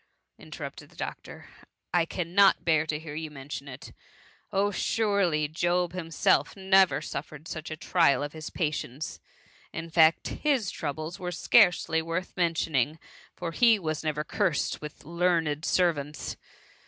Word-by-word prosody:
^ - - -15
interrupted - - -8
the - - -21
doctor; - - -7 0.2
" - - -56
I - - +1
cannot 180 +3 +3
bear 160 -2 +3
to 150 - -1
hear 155 -1 -8
you 155 +1 -4
mention 140 0 -8
it. 130 -2 -10 0.6
Ob, 200 +1 +1
surely 200 -11 +1
Job 175 +3 0
himself 165 -3 +1
never 190 -1 +4
suffered 155 +1 -7
such 155 -1 -6
a 155 - -5
trial 160 -4 +3
of 145 - -5
his 155 -1 -7
patience! 150 -3 -3 0.5
In 165 0 -6
fact, 160 0 +4
his 270 -10 0
troubles 155 +2 -5
were 180 -1 -4
scarcely 165 -1 +4
worth 165 +3 -4
mentioning, 160 -4 +1 0.4
for 170 -2 -4
he 230 +4 +5
was 155 -5 -3
never 150 -1 -1
cursed 175 -2 -1
with 150 -1 -9
learned 165 -2 0
servants 150 -5 0
165 Hz, 145 wpm, -28 LUFS, 150-180 Hz, 0.6 s, he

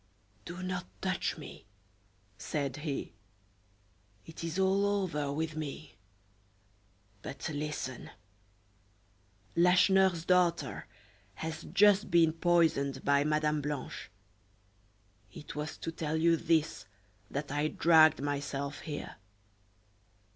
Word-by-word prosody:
"Do 175 +2 -7
not 185 -1 -3
touch 185 -2 -1
me," 145 -8 -11 0.7
said 140 +2 -3
he. 150 -2 -4 1.1
"It 160 0 -9
is 165 +1 -3
all 190 +1 +3
over 185 -8 0
with 155 +2 -3
me; 155 -1 -6 1.3
but 135 - -6
listen; 150 -4 -4 1.5
Lacheneur's 180 0 +4
daughter 175 -9 +1 0.5
has 160 +4 -5
just 205 +2 +4
been 165 -2 +4
poisoned 160 -6 +1
by 140 0 +4
Madame 150 0 +1
Blanche. 145 -2 -5 1.2
It 150 - -10
was 150 +1 -4
to 165 - -5
tell 160 -1 -2
you 165 +1 +4
this 160 -8 0 0.4
that 140 0 -4
I 145 +1 +1
dragged 160 -3 +5
myself 145 0 -3
here. 150 -3 -6
155 Hz, 100 wpm, -31 LUFS, 145-175 Hz, 1.5 s, dragged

